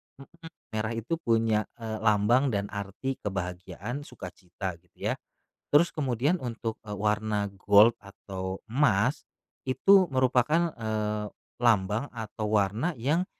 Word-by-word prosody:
m 135 - -12 0.2
m 165 - -10 0.3
merah 110 +1 -1
itu 115 +9 -2
punya 115 -4 +2 0.2
e 115 - -6 0.2
lambang 110 +6 +4
dan 100 -1 -1
arti 100 +7 -4
kebahagiaan, 95 +6 -4
sukacita 95 -5 -7
gitu - - -7
ya. - - -1 0.6
Terus 170 +4 +6
kemudian 140 +4 +1
untuk, 115 -2 -4
eee, 105 - -5
warna 105 0 0 0.2
gold 105 +3 +7
atau 95 -2 -6
emas, 125 -1 +2 0.4
itu 190 +9 +5
merupakan, 130 +6 +2
eee, 105 -1 -2 0.4
lambang 110 +2 +2
atau 110 -2 -5
warna 105 - 0
yang 150 +10 +1
110 Hz, 125 wpm, -28 LUFS, 100-130 Hz, 0.6 s, gold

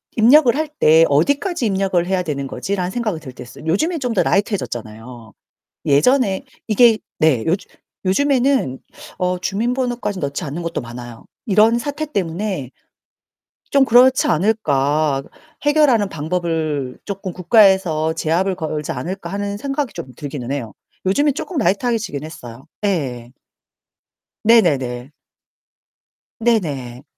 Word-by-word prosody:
입력을 245 +3 +6
할 310 +2 -1
때 160 +2 +6
'어디까지 280 - +1
입력을 195 -4 +1
해야 185 0 0
되는 140 -4 -3
거지?' 195 +8 -3
라는 180 -1 -2
생각이 215 -7 -2
들 130 -4 -10
때 125 - -9
있어요. 135 +4 -13
요즘엔 315 - 0
좀 250 -4 -2
더 200 - +2
라이트 205 +4 +1
해졌잖아요. 115 - -6 0.5
예전에 195 - +3 0.2
이게 225 +1 +5 0.2
네, 145 -8 +3
요즘 180 +4 -1 0.4
요즘에는 260 - +2 0.4
어 180 0 0
주민번호까지 235 +2 -2
넣지 140 -1 -3
않는 155 +4 -5
곳도 170 - -3
많아요. 120 -1 -10 0.2
이런 220 +3 +4
사태 290 +4 -4
때문에 185 - -3 1.0
좀 275 -1 +5
그렇지 255 +2 +5
않을까, 150 -7 +1 0.4
해결하는 290 -8 +3
방법을 160 -5 -2
쪼끔 195 -2 -5
국가에서 180 -4 +3
제압을 170 +4 0
걸지 155 -4 -4
않을까 175 +10 -5
하는 200 0 -3
생각이 275 +3 -3
좀 130 - -8
들기는 140 -4 -5
해요. 120 -7 -4 0.3
요즘에 285 +10 +3
조금 320 +4 -5
라이트 200 -1 +1
하게 240 -2 +2
지긴 170 -10 -5
했어요. 125 -6 -10 0.2
예예. 130 -11 -2 1.1
네네네. 135 - +2 1.3
네네. 145 - -1
185 Hz, 300 characters per minute, -19 LUFS, 145-230 Hz, 1.3 s, 입력을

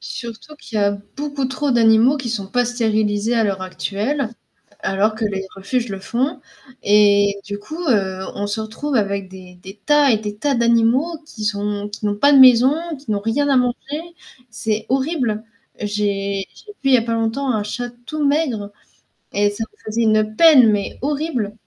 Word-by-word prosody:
Surtout 235 +6 -8
qu'il 225 -6 -7
y - - +2
a 200 0 +3 0.2
beaucoup 285 -2 -3
trop 265 +2 -1
d'animaux 230 +4 +4
qui 255 -3 -4
sont 205 -4 -3
pas 245 +4 +1
stérilisés 220 -2 0
à 225 - +3
l'heure 195 -3 -1
actuelle, 210 +8 -2 0.5
alors 200 +3 +1
que 220 0 -3
les 195 -2 -2
refuges 230 +5 -2
le 195 -1 -6
font, 260 - -2 0.4
et 205 -1 +4
du 205 -1 -5
coup, 310 +10 -9
heu, 190 -5 +1
on 205 - -3
se 205 +2 -3
retrouve 240 +7 -4
avec 200 -3 -1
des 185 -1 -13
des 195 +2 -11
tas 295 -2 +4
et 220 - +3
des 210 -1 -6
tas 280 +6 0
d'animaux 235 +7 +2
qui 215 -7 -8
sont 205 0 -2
qui 210 0 -4
n'ont 205 - 0
pas 285 +6 +4
de 275 - +7
maison, 255 +2 +7 0.2
qui 265 -5 -9
n'ont 200 -1 0
rien 260 +7 0
à 275 - +3
manger 250 +4 -1 0.5
c'est 215 -1 -3
horrible. 260 -5 0 0.4
J'ai 200 -2 -2
j'ai 420 - -13
vu 270 - +2
il - - +4
y - - +9
a 230 - +1
pas 230 0 -2
longtemps 230 +5 -1
un 215 -4 0
chat 245 +3 -4 0.2
tout 305 -1 -3
maigre 260 -9 0 0.6
et 205 0 +2
ça 205 +2 -4
me 425 - -32
faisait 230 +2 0
une 215 -1 +2
peine, 280 -8 +7
mais 205 -1 -2
horrible. 285 -7 -2
225 Hz, 190 wpm, -20 LUFS, 205-260 Hz, 0.6 s, y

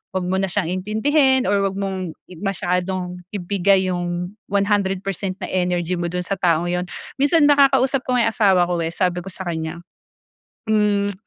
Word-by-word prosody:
'wag 185 -1 -1
mo 190 - +1
na 195 - 0
siyang 185 -2 -1
intindihin 265 +6 +2
or 200 0 +3
'wag 195 - -5
mong 190 -4 -3 0.2
masyadong 180 -1 -2 0.2
ibigay 190 0 +2
yung 175 0 -3 0.2
100% 195 -2 0
na - - -2
energy 180 -1 0
mo 175 - -1
do'n 180 +1 -3
sa 195 +2 -3
taong 175 -1 +2
yun. 180 0 -1 0.3
Minsan 290 +3 +4
nakakausap 275 -1 +4
ko 255 - +1
nga 245 - +3
yung - - +1
asawa 195 -5 +4
ko, 175 -1 0
eh, 165 +1 -3
sabi 180 -1 0
ko - - -9
sa 190 - -6
kanya, 160 0 -4 0.9
hmm, 205 -1 +2
190 Hz, 170 wpm, -21 LUFS, 180-205 Hz, 0.9 s, Minsan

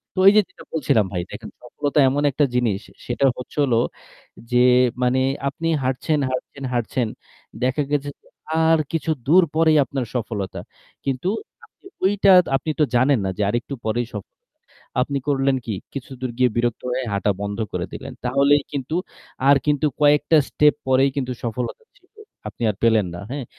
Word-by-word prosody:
তো - - -2
এইযে 210 +1 +6
যেটা - - -15
বলছিলাম 120 -9 +2
ভাই, 90 - -1
দেখেন - - -8
সফলতা 145 +4 -2
এমন 145 +2 0
একটা 145 +2 +2
জিনিস, 115 -6 +1 0.3
সেটা 125 +3 +1
হচ্ছে 125 - -10
হলো 120 -5 +2 0.7
যে 125 - +3 0.5
মানে 125 +1 +2 0.3
আপনি 165 +4 -4 0.2
হাঁটছেন, 135 +4 0
হাঁটছেন, 130 +2 -5
হাঁটছেন। 120 0 -1 0.6
দেখা 130 +3 +1
গেছে 145 -1 0
যে - - -27 0.4
আর 165 0 +4
কিছু 160 -1 -1 0.2
দূর 180 +4 +6
পরেই 160 -1 +4
আপনার 135 -3 -3
সফলতা 105 -5 -3 0.5
কিন্তু 135 +6 -1 0.4
আপনি 440 - -31 0.2
ওইটা 200 0 +4 0.2
আপনিতো 155 +3 -2
তো - - -17
জানেন 130 +1 +4
না - - 0
যে - - -2
আরেকটু 120 +5 -2
পরেই 115 +2 -1
সফল। 105 -2 -8 0.7
আপনি 140 +2 -1
করলেন 135 -1 +2
কি 110 - -3 0.2
কিছুদূর 130 -2 -6
গিয়ে 125 -1 +4
বিরক্ত 120 -1 0
হয়ে 130 - -1
হাটা 100 +1 +1
বন্ধ 100 0 -3 0.2
করে - - -2
দিলেন, - - -7
তাহলেই 140 +3 +3
কিন্তু 140 +3 -3 0.5
আর 140 - +8
কিন্তু 150 0 +2 0.2
কয়েকটা 150 +2 +4
স্টেপ 150 0 +4
পরেই 130 +1 +4
কিন্তু 130 -2 -1
সফলতা 120 - -4
ছিলো, 430 +1 -24 0.3
আপনি - - -10
আর - - -15
পেলেন 110 -4 +4
না, 85 - -7
হ্যাঁ? 140 -3 -4
135 Hz, 165 wpm, -22 LUFS, 120-145 Hz, 0.7 s, আর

